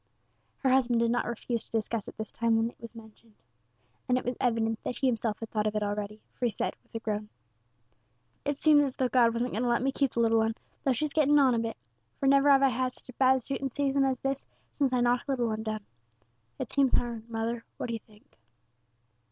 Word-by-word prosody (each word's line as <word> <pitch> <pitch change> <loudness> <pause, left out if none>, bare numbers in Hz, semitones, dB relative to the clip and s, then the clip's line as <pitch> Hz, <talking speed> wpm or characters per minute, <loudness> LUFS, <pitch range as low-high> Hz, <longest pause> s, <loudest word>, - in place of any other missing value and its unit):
Her 265 - +4
husband 245 -3 +3
did 230 0 +2
not 245 - 0
refuse 235 0 -3
to - - -23
discuss 225 -1 -2
it - - -10
this 220 0 -5
time 230 -1 +1
when 225 +1 +1
it - - -31
was 230 0 -5
mentioned, 220 0 -15 0.7
and 250 - +4
it - - -3
was 245 +1 -1
evident 225 -2 +1
that 245 - -3
he 275 - -2
himself 230 -4 0
had 225 - -7
thought 215 -1 0
of 215 - -2
it 210 - 0
already, 205 +1 -3
for 250 - -2
he - - +1
said, - - -3
with - - -24
a - - -1
groan 210 -1 -3 1.1
"It 290 -1 -1
seems 300 -1 +6
as 270 -3 -2
though 255 -1 0
God 240 -2 +4
wasn't 235 +2 -1
going 220 - -2
to 245 - +1
let 240 +1 +2
me 270 - +2
keep 275 -1 0
the - - -1
little 225 -1 +4
'un, 220 0 0 0.3
though 270 - +3
she's 290 +4 -2
getting 295 -1 +4
on 270 -3 +5
a 230 - +1
bit, 225 -1 -3 0.4
for - - -1
never 275 +1 +5
have 275 -1 +6
I 270 - +6
had 255 +1 -1
such - - -16
a - - -8
bad 260 0 +3
shooting 270 +1 -3
season 275 +1 +1
as 265 -1 +1
this 275 0 -1 0.3
since 275 -3 +1
I 250 -1 +2
knocked 245 +2 +2
the 275 - +1
little 240 -3 0
'un 215 0 -3
down. 215 -2 -4 0.7
It - - -5
seems 275 -3 +3
hard, 235 -1 -1
mother; 230 +1 -2
what - - -3
do 235 - -3
you 225 - -3
think?" 210 - -24
240 Hz, 245 wpm, -29 LUFS, 225-265 Hz, 1.1 s, seems